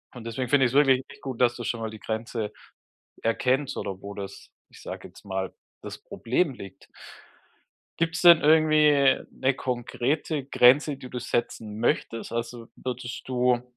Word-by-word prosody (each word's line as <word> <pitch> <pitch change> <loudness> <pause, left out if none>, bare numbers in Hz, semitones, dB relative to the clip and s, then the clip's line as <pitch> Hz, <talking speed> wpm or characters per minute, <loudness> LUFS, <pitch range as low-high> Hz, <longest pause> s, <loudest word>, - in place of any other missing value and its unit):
Und 120 - -9
deswegen 120 +2 -3
finde 135 -2 +4
ich 120 - +1
es - - -5
wirklich 135 -2 +5
echt - - -14
gut, 130 -3 -5
dass 120 -1 +4
du 120 - -6
schon 115 0 -3
mal 110 - -3
die 110 -1 -10
Grenze 110 -1 -4 0.7
erkennst 130 +4 0
oder 95 -1 -5
wo 100 0 -7
das, 100 -1 -9 0.2
ich - - -16
sage - - -7
jetzt - - -18
mal, 95 -1 -3 0.3
das - - -8
Problem 135 +5 -1
liegt. 95 -5 -12 1.1
Gibt 165 0 0
es - - -3
denn 170 -2 +9
irgendwie 150 -3 +5
'ne 135 0 0
konkrete 130 +4 -2
Grenze, 140 +3 +5
die 130 - -10
du 125 -1 -5
setzen 115 -3 -3
möchtest? 115 0 -1
Also, 115 0 -4
würdest 125 -1 -6
du 125 -1 +2
da - - -16
125 Hz, 175 wpm, -26 LUFS, 115-135 Hz, 1.1 s, denn